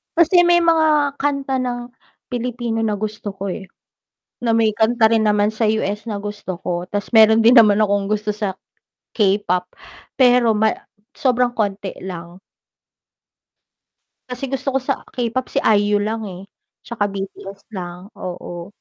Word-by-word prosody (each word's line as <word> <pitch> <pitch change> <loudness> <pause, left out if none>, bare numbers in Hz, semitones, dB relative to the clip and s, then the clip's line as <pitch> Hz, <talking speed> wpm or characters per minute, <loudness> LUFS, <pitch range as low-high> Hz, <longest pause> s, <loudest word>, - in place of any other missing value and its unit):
Kasi 345 +1 +5
may 345 0 +5
mga 305 -4 +2
kanta 275 -2 -1
ng 245 -1 -4 0.4
Pilipino 240 -2 -3
na 210 -1 0
gusto 210 0 -5
ko, 195 0 -4
eh, 190 +1 -7 0.8
na 235 - +1
may 220 -2 +2
kanta 225 +1 +3
rin 225 -1 +3
naman 210 0 +2
sa 220 0 +1
US 210 0 -1
na 205 - -3
gusto 205 -3 -6
ko, 175 0 -3
tas 205 -1 -3
meron 220 0 +7
din 235 +3 +7
naman 215 -4 +6
akong 200 -2 +1
gusto 215 0 -1
sa, 205 -3 -3 0.5
K-pop, 195 -4 0 0.4
pero 245 -3 +4
ma 215 +1 +3 0.5
sobrang 250 -2 +2
konti 200 -4 -3
lang. 175 -1 -8 1.9
Kasi 250 +1 -7
gusto 270 +1 -1
ko - - +3
sa 275 - +3 0.2
K-pop 245 +1 -2
si - - +2
IU 205 0 +2
lang, 220 +1 -2
eh, 180 0 -9 0.4
tsaka 235 -3 -3
BTS 195 0 -7
lang, 175 -1 -6 0.2
oo. 175 -1 -7
215 Hz, 145 wpm, -20 LUFS, 200-245 Hz, 1.9 s, meron